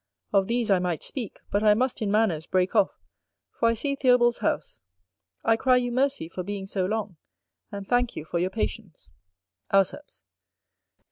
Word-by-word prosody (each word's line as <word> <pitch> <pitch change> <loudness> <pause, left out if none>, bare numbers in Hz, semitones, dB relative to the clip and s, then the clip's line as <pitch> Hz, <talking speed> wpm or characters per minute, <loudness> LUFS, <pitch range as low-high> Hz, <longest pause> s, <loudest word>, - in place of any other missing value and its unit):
Of 195 -1 +3
these 235 -2 0
I 190 - +5
might 180 -3 -2
speak, 240 -7 -5
but 205 - +1
I 210 -1 +5
must 255 +2 -1
in 210 - 0
manners 200 -7 +1
break 185 0 +1
off, 195 - +5 0.6
for 230 - +1
I 230 - +1
see 280 +5 -2
Theobald's 250 -3 +3
House. 110 - -2 0.6
I 225 - +4
cry 255 +2 +3
you 245 -1 -1
mercy 265 -7 0
for 175 +2 -6
being 195 +1 -5
so 190 -1 -1
long, 210 -4 -3 0.5
and 200 -1 -7
thank 245 -1 +1
you 150 - -6
for 170 - -2
your 180 +2 0
patience. 195 - -5 0.6
Auceps. 195 +9 0
210 Hz, 175 wpm, -26 LUFS, 185-240 Hz, 0.6 s, I